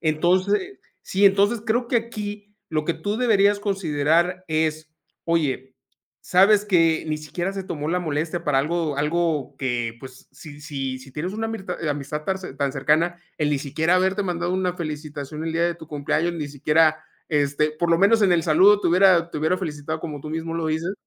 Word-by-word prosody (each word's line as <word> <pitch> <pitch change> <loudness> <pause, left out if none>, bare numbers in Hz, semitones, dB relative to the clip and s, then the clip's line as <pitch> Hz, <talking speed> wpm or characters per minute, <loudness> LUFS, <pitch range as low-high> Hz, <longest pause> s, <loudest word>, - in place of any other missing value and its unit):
Entonces 185 - +1 0.3
Sí. 195 +2 +1
Entonces 200 +3 +3
creo 235 +2 0
que 240 - +2
aquí 210 -2 -5
lo 155 -1 -1
que 170 - 0
tú 205 +7 -3
deberías 205 -4 +3
considerar 175 -2 0
es: 155 0 -1 0.3
"Oye". 135 -6 -1 0.5
Sabes 200 +3 +4
que 165 -5 +3
ni 155 - 0
siquiera 165 +5 -4
se 195 -1 -4
tomó 150 -4 -4
la 180 +2 +1
molestia 160 +1 -2
para 140 -2 +2
algo 155 0 -1
algo 150 -2 -1
que, 120 -3 -2
pues, 130 0 -12
si 145 +1 -12
si 135 -4 -4
si 130 +1 -14
tienes 175 +7 -4
una 225 +1 -2
amistad 190 -6 -5
eh, 155 - -1
amistad 145 +1 -4
tan 190 0 0
ce 185 - -8
tan 140 -1 -1
cercana, 155 +5 +1 0.2
el 150 -1 +1
ni 145 - +1
siquiera 160 +5 0
haberte 190 +2 +1
mandado 175 -1 -2
una 185 -1 0
felicitación 150 -2 -6
el 165 - -2
día 170 +1 +2
de 175 0 0
tu 160 - -12
cumpleaños, 155 +3 -1
ni 155 -3 -4
siquiera, 155 +2 +2 0.3
este, 150 0 +1
por 170 +2 -1
lo 165 - +5
menos 220 +3 +4
en 185 -3 +4
el 170 - +2
saludo 195 +6 +5
te - - +1
hubiera 175 -1 +4
te - - -4
hubiera 160 +4 +1
felicitado 155 -2 -4
como 150 -4 -6
tú 155 - -8
mismo 160 +1 -4
lo 165 -1 -2
dices, 160 +4 -1
165 Hz, 195 wpm, -23 LUFS, 150-185 Hz, 0.5 s, lo